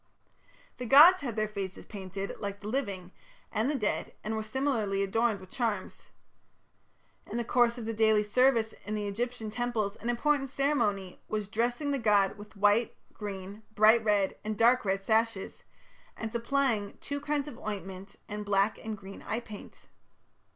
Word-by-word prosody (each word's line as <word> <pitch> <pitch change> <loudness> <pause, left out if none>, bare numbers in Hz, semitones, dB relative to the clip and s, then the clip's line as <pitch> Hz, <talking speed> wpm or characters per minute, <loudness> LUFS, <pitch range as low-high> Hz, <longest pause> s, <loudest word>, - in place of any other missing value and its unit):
The 250 - -5
gods 320 +9 +9
had 245 -6 -4
their 215 -1 0
faces 195 -3 -6
painted 195 -1 -6
like 200 0 -4
the 205 - -7
living 200 -7 -3 0.4
and 220 +5 0
the 295 - 0
dead 210 -6 -2
and 220 +1 -2
were 220 - -1
similarly 215 -4 0
adorned 220 +2 +1
with 185 -1 -14
charms. 225 -7 -3 1.2
In - - -4
the 240 - 0
course 240 0 +3
of 235 - -6
the 225 - -2
daily 220 -1 +4
service 230 +1 +3
in 215 - -3
the 210 -1 -2
Egyptian 225 +1 -3
temples 220 -3 -1
an 235 - -4
important 275 +3 +1
ceremony 235 -10 0
was 210 -2 -2
"dressing 240 +7 -1
the 280 - 0
god 205 -4 +3
with 205 +1 -13
white, 205 +3 +3 0.2
green, 200 0 -7
bright 220 +2 +6
red, 205 -3 +2
and 215 -1 -3
dark 235 +1 +4
red 195 0 0
sashes, 220 -1 0 0.5
and 225 -1 -4
supplying 235 -3 0
two 285 0 -4
kinds 295 -1 -1
of 270 - -9
ointment 195 -2 -6
and 210 -1 -5
black 200 +1 +1
and 220 -1 -4
green 195 0 -10
eye 220 - -2
paint". 215 -3 -11
220 Hz, 165 wpm, -30 LUFS, 200-240 Hz, 1.2 s, gods